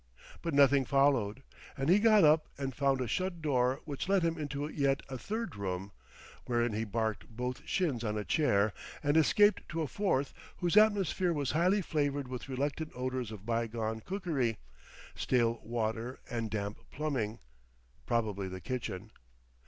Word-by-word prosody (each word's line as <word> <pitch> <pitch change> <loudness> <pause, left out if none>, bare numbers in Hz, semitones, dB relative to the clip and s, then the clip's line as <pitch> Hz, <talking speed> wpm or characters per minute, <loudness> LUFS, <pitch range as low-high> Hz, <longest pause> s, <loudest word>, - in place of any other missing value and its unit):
But 165 -4 -2
nothing 140 -1 +6
followed, 135 -4 +2 0.3
and 135 0 -1
he 185 +5 +6
got 215 -2 +6
up 155 +1 +5
and 135 -1 -3
found 135 0 +1
a 125 - -1
shut 185 - -1
door 130 -4 +1
which 150 +4 -4
let 195 -3 +3
him 165 -1 +1
into 145 -2 -3
yet 140 -3 0
a 130 - -4
third 220 - -4
room, 95 0 -4 0.5
wherein 120 -2 +1
he 110 +2 -1
barked 110 0 -2
both 125 +2 -4
shins 150 - 0
on 105 -1 -1
a 105 - -3
chair; 105 -9 +2 0.3
and 145 0 +2
escaped 205 +6 +4
to 165 +1 -1
a - - -2
fourth 145 -7 0 0.2
whose 175 +1 0
atmosphere 195 -5 +4
was 145 -4 -1
highly 185 +5 +3
flavored 145 -4 -1
with 125 0 -6
reluctant 145 +4 -2
odors 125 -2 -3
of 105 -2 -9
bygone 115 -1 -1
cookery, 155 - -1 0.6
stale 120 -2 +1
water 115 +2 -2
and 115 -2 -2
damp 105 -1 -3
plumbing 130 -8 -2 0.7
probably 105 -5 0
the 95 0 -6
kitchen. 110 -4 -5
135 Hz, 160 wpm, -32 LUFS, 115-155 Hz, 0.7 s, nothing